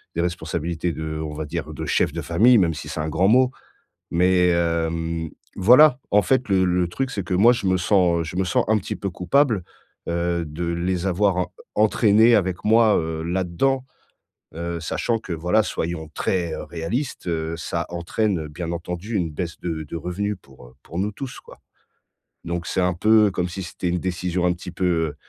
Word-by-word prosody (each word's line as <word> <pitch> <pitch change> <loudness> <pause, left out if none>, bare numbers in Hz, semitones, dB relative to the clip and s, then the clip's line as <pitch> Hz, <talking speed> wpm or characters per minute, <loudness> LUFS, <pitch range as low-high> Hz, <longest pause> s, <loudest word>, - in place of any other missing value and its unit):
Des 85 - +1
responsabilités 85 -1 -2
de 80 0 -4
on 75 -1 -5
va 75 0 -4
dire, 80 0 -5
de - - -5
chef - - +1
de - - -4
famille, 115 +9 +4
même 85 -4 +3
si 75 0 -7
c'est 80 - -5
un 75 0 -2
grand 90 +5 +2
mot 130 +2 +4 0.6
mais 90 +1 +3
hem, 85 -1 -1 0.3
voilà, 125 +7 +6
en 105 0 +5
fait, 130 +3 +1
le 95 -1 +3
le 90 0 +2
truc 135 +9 -3
c'est 100 -6 -4
que, 90 - -2
moi, 115 +6 +6
je 105 -5 -2
me 95 0 +3
sens, 90 -2 +2
heu, - - -2
je 80 +3 -7
me 95 - +1
sens 90 - +1
un 110 0 +4
petit 95 - -5
peu 100 - -4
coupable, 100 - +1 0.4
heu, 85 0 -1
de 80 +4 -5
les 90 +2 -1
avoir 90 -1 +1 0.3
entraîner 110 +2 +5
avec 95 -3 -1
moi, 110 0 +5
heu, 80 0 -3
là-dedans, 95 +10 0 0.7
heu, 85 0 -4
sachant 115 +6 -1
que 90 - -7
voilà 90 +7 +2
soyons 80 -4 -4
très, 85 -3 -1
heu, - - -5
réaliste, 85 - -4
heu, 80 -1 -2
ça 85 0 -3
entraîne, 90 +2 -1
heu, 75 - -6
bien 85 +2 -5
entendu 90 +6 -5
une 85 -4 0
baisse 85 +3 -5
de 80 -3 -3
de 80 - -7
revenus 100 +5 -3
pour, 65 -2 -16
heu, 65 - -20
pour 85 - -7
nous 105 +2 -1
tous, 130 +3 -7
quoi. - - -16 0.8
Donc 85 0 -3
c'est - - 0
un 90 -1 +1
peu 105 +2 +4
comme 90 -1 -1
si 95 +2 -6
c'était 90 +1 -4
une 90 +1 0
décision 90 0 -1
un 90 - +3
petit 90 +1 -8
peu 85 -4 0
90 Hz, 200 wpm, -23 LUFS, 85-100 Hz, 0.8 s, voilà